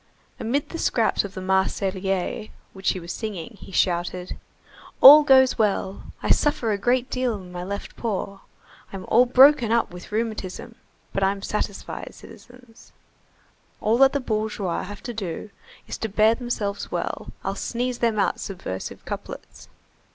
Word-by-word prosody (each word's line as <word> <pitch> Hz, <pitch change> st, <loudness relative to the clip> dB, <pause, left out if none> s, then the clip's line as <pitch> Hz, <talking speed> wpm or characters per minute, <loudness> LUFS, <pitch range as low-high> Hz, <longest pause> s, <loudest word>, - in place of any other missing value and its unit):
Amid 275 Hz, +6 st, -1 dB
the 330 Hz, -, -6 dB
scraps 230 Hz, -2 st, +1 dB
of 200 Hz, -1 st, -8 dB
the 185 Hz, -, -5 dB
Marseillaise 190 Hz, +1 st, -1 dB, 0.2 s
which 190 Hz, 0 st, 0 dB
he 185 Hz, -, -5 dB
was 170 Hz, 0 st, -7 dB
singing, 215 Hz, 0 st, -6 dB
he -, -, -11 dB
shouted:— 180 Hz, 0 st, -1 dB, 0.6 s
"All 295 Hz, +3 st, +11 dB
goes 265 Hz, -4 st, +5 dB
well. 200 Hz, -2 st, 0 dB, 0.2 s
I -, -, +1 dB
suffer 245 Hz, -6 st, +2 dB
a 205 Hz, -, 0 dB
great 245 Hz, +3 st, +1 dB
deal 255 Hz, -3 st, 0 dB
in 185 Hz, -3 st, -10 dB
my 175 Hz, 0 st, -6 dB
left 200 Hz, +2 st, -6 dB
paw, 200 Hz, -3 st, -3 dB, 0.5 s
I'm 195 Hz, -1 st, -7 dB
all 245 Hz, +2 st, +5 dB
broken 260 Hz, -2 st, +6 dB
up 235 Hz, -4 st, +2 dB
with 180 Hz, +3 st, -11 dB
rheumatism, 220 Hz, 0 st, -4 dB, 0.4 s
but 195 Hz, -, 0 dB
I'm 195 Hz, +1 st, 0 dB
satisfied, 205 Hz, -1 st, -4 dB
citizens. 245 Hz, -2 st, -16 dB, 0.9 s
All 225 Hz, +3 st, +1 dB
that 270 Hz, 0 st, +6 dB
the 285 Hz, -, +1 dB
bourgeois 215 Hz, -6 st, -2 dB
have 205 Hz, -1 st, -9 dB
to 240 Hz, -, -5 dB
do 200 Hz, -1 st, -5 dB, 0.4 s
is -, -, -6 dB
to 225 Hz, -, -3 dB
bear 215 Hz, +2 st, +4 dB
themselves 225 Hz, -5 st, -4 dB
well, -, -, -4 dB
I'll -, -, -2 dB
sneeze 245 Hz, +1 st, -3 dB
them 230 Hz, -2 st, +1 dB
out 200 Hz, -, +1 dB
subversive 180 Hz, -, -6 dB
couplets. -, -, -8 dB
215 Hz, 155 wpm, -24 LUFS, 190-240 Hz, 0.9 s, All